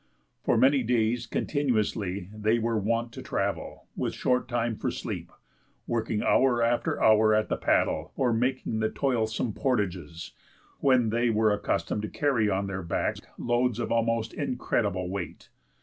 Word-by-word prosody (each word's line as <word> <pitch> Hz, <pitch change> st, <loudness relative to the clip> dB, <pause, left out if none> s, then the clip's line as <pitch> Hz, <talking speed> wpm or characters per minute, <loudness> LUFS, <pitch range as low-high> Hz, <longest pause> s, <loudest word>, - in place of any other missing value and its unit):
For -, -, +2 dB
many 135 Hz, +1 st, +5 dB
days 115 Hz, 0 st, +1 dB
continuously 105 Hz, -, -1 dB
they 110 Hz, +2 st, +1 dB
were 115 Hz, -1 st, 0 dB
wont 115 Hz, +3 st, -1 dB
to -, -, -8 dB
travel, -, -, -3 dB
with -, -, -2 dB
short 125 Hz, 0 st, +1 dB
time 120 Hz, -2 st, -1 dB
for -, -, -2 dB
sleep, -, -, -5 dB, 0.5 s
working 110 Hz, -2 st, -1 dB
hour 125 Hz, -3 st, +3 dB
after 120 Hz, +1 st, +1 dB
hour 110 Hz, 0 st, +5 dB
at 110 Hz, 0 st, +1 dB
the -, -, +1 dB
paddle, -, -, +1 dB
or 125 Hz, -3 st, +1 dB
making 125 Hz, -1 st, -1 dB
the 110 Hz, 0 st, +1 dB
toilsome 115 Hz, -4 st, -1 dB
portages, 95 Hz, -, -2 dB, 0.5 s
when 125 Hz, -5 st, +3 dB
they 120 Hz, +1 st, +2 dB
were 110 Hz, -1 st, +3 dB
accustomed 105 Hz, 0 st, -1 dB
to 110 Hz, -, -4 dB
carry 130 Hz, -8 st, +1 dB
on 100 Hz, 0 st, 0 dB
their 95 Hz, -1 st, -4 dB
backs 85 Hz, -, -2 dB, 0.2 s
loads 120 Hz, -1 st, +1 dB
of 120 Hz, -, -3 dB
almost 115 Hz, -1 st, 0 dB
incredible 105 Hz, -8 st, -1 dB
weight. 95 Hz, -2 st, -6 dB
115 Hz, 150 wpm, -27 LUFS, 105-120 Hz, 0.5 s, many